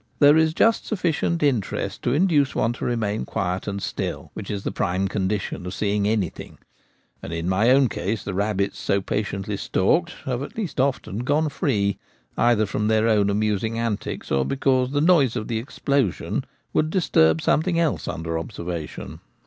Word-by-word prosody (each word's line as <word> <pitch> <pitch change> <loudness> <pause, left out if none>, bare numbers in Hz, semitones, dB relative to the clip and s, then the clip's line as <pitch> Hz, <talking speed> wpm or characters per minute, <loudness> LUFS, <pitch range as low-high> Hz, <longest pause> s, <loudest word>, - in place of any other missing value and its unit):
There 145 0 +7
is 160 0 +3
just 225 0 +3
sufficient 170 -4 0
interest 125 -9 -1
to 120 - 0
induce 145 -2 +2
one 115 +2 +1
to - - -5
remain 110 -3 -1
quiet 90 0 -3
and 100 -1 -2
still, - - -4
which 105 - -7
is 100 -2 -3
the - - -2
prime 95 +2 0
condition 100 -1 -2
of 90 - -5
seeing 105 -1 0
anything; 105 -5 -2 0.6
and - - -7
in 85 +1 -3
my 100 +6 +3
own 135 +1 +5
case 105 -1 -3
the 100 - -4
rabbits 100 0 -1
so 100 - +1
patiently 100 0 -3
stalked 170 - +1
have 130 -1 -2
at 140 - -7
last 195 -10 -3
often 130 -6 0
gone 145 +5 +1
free, 105 - 0 0.4
either 120 -2 +3
from 105 +1 -1
their 110 0 +3
own 105 -3 +3
amusing 105 +2 0
antics, 115 -3 -3
or 70 0 +3
because 130 - +1
the 145 +1 0
noise 155 -8 +4
of 110 -3 -3
the 115 -1 -1
explosion 135 - -1 0.3
would 155 - +2
disturb 80 - +3
something 165 - +1
else 165 -3 0
under 80 0 -3
observation. 85 -3 -6
110 Hz, 175 wpm, -23 LUFS, 100-140 Hz, 0.6 s, There